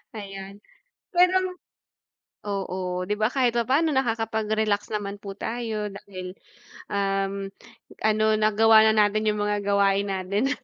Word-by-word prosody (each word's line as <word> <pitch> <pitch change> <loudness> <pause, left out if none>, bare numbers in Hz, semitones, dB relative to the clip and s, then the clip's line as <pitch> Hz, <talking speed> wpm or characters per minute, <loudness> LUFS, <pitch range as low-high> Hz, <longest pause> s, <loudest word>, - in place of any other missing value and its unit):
Ayan. 195 -1 -8 0.6
Pero 360 +1 +5 1.1
oo. 185 -2 -3
'Di 210 - +1
ba 215 0 +2
kahit 250 -3 +2
papano 270 +8 +2
nakakapag-relax 220 -4 0
naman 205 -1 -3
po 200 -1 -8
tayo 225 -3 -3
dahil, 185 -2 -9 0.5
um, 195 0 -1 0.5
ano 215 0 +2
nagawa 220 +1 +5
na - - +3
natin 215 +1 -1
yung 210 - -1
mga 205 0 0
gawain 200 0 +2
natin. 195 +6 -1
205 Hz, 120 wpm, -25 LUFS, 195-220 Hz, 1.1 s, Pero